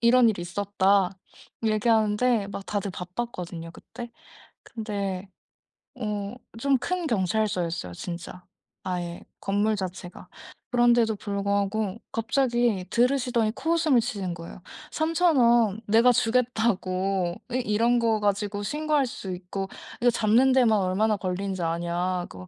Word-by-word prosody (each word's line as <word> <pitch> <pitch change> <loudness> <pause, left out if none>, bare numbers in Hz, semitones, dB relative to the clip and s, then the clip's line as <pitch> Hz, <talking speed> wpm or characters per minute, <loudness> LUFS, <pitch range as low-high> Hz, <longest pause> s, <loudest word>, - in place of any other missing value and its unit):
"이런 235 0 +6
일이 195 -5 -1
있었다." 195 0 +1 0.5
얘기하는데 220 +1 +2
막 200 -1 -7
다들 205 -1 -2
바빴거든요 180 -3 -6
그때. 240 +7 -10 0.5
근데 200 -4 -4 0.7
어 210 -1 -3 0.2
좀 275 +1 +3
큰 355 +5 -2
경찰서였어요 185 - -1
진짜. 175 - -7 0.4
아예 175 -2 -4 0.2
건물 205 +2 +1
자체가. 185 -2 -7 0.4
그런데도 240 -2 +4
불구하고 200 +1 -1
갑자기 240 -3 +1
들으시더니 245 -2 +2
코웃음을 320 -6 +2
치시는 200 -7 -3
거예요. 170 +2 -10 0.3
"3,000 330 0 +2
원 235 -3 +4
내가 230 +4 +6
주겠다."고. 195 -7 +1
어 - - -8
"이런 240 0 +2
거 225 -2 +2
가지고 205 0 -1
신고할 300 +3 +1
수 195 -6 -6
있고 185 +2 -5 0.3
이거 245 - +5
잡는 235 +4 +4
데만 240 -5 +4
얼마나 200 +3 +1
걸리는지 185 0 -3
아냐? 175 +2 -1
그거 90 0 -11
210 Hz, 280 characters per minute, -26 LUFS, 185-240 Hz, 0.7 s, 이런